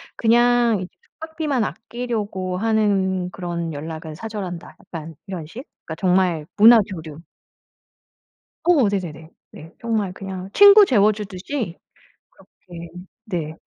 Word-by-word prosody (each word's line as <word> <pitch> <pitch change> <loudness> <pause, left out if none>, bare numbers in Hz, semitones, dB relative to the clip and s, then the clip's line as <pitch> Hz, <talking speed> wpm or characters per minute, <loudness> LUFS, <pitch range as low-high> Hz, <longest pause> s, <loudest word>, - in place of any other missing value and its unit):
그냥 240 -2 +3
이 180 - -5 0.3
숙박비만 315 -6 -2
아끼려고 215 -6 -4
하는 195 -4 +1
그런 170 -3 -4
연락은 160 +1 -7
사절한다.' 190 -3 -7
약간 165 -2 -9
이런 180 -6 -6
식. 240 - -9 0.2
그러니까 160 - -6
정말 180 -4 +1
문화 225 +2 +8
교류. 160 -6 -8 1.5
어 310 -11 +4
네네네. 165 -5 -5 0.2
네. 160 +3 -13
정말 215 -5 -1
그냥 190 -1 -7
친구 405 0 +8
재워 210 - +4
주듯이 205 0 -5 0.5
그렇게 170 -2 -13 0.4
네. 165 -6 -4
190 Hz, 250 characters per minute, -21 LUFS, 170-225 Hz, 1.5 s, 문화